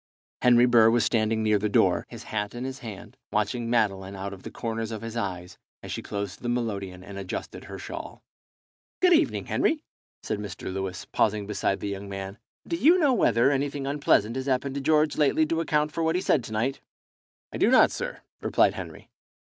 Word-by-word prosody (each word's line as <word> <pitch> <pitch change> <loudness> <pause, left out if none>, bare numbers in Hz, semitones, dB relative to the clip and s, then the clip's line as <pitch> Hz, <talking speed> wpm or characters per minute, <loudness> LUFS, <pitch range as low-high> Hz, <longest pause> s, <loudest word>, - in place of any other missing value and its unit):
Henry 120 0 +6
Burr 115 -2 +6
was 115 -2 +3
standing 110 -1 +1
near 105 -1 +3
the 105 +1 -1
door, - - +3
his - - -9
hat 105 +1 -3
in 120 - -4
his 130 0 -5
hand, 110 -5 -9
watching 115 +3 -1
Madeline 100 -4 0
out 100 +1 -5
of 95 - -11
the - - -7
corners 115 -1 -4
of 110 -1 -6
his 115 0 -6
eyes, 90 -5 -4 0.2
as - - -7
she - - -3
closed 100 -1 -5
the 120 - -3
melodeon 100 -6 -3
and 100 0 -8
adjusted 95 -1 -6
her - - -8
shawl. - - -8 0.8
"Good 365 -1 +5
evening, 320 -1 +2
Henry," 310 -1 0 0.4
said - - -2
Mr. 100 -2 -6
Lewis, 95 -1 -4
pausing 105 -1 0
beside 100 -1 -1
the 100 - -2
young 100 0 -6
man. 95 +1 -6 0.3
"Do 170 - -1
you 310 - +6
know 295 -7 +3
whether 135 - +3
anything 140 0 -1
unpleasant 135 -5 +2
has 130 +1 -4
happened 135 +1 0
to 140 - -3
George 155 +1 +2
lately 150 +2 +3
to 165 +1 0
account 150 -1 +1
for 165 - -3
what 160 +1 +1
he 180 - +1
said 140 -8 +2
to - - -9
night?" 115 +6 -1 0.7
"I - - -3
do - - +4
not, - - +6
sir," - - -5 0.2
replied - - +3
Henry. - - -8
115 Hz, 205 wpm, -26 LUFS, 100-140 Hz, 0.8 s, Henry